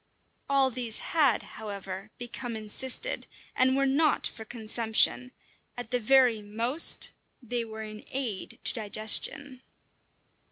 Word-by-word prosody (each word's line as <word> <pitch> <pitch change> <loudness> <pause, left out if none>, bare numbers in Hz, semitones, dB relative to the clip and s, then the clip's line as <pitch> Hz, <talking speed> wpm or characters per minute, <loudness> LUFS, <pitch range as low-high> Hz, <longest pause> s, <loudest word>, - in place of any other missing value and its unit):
All 270 -1 +3
these 235 -2 -2 0.2
had, 285 -9 +3
however, 200 -1 -8
become 245 0 -6
encysted, 260 - +1 0.3
and 260 +1 +3
were 275 - +2
not 285 +2 +2
for 220 - -5
consumption; 225 +2 +1 0.5
at 245 -1 -7
the 250 - +1
very 245 -1 +3
most 230 +9 +2 0.3
they 240 -1 -3
were 220 -1 -8
an 215 0 -9
aid 245 -8 -4
to - - +5
digestion! 230 +5 +1
240 Hz, 120 wpm, -28 LUFS, 220-265 Hz, 0.5 s, to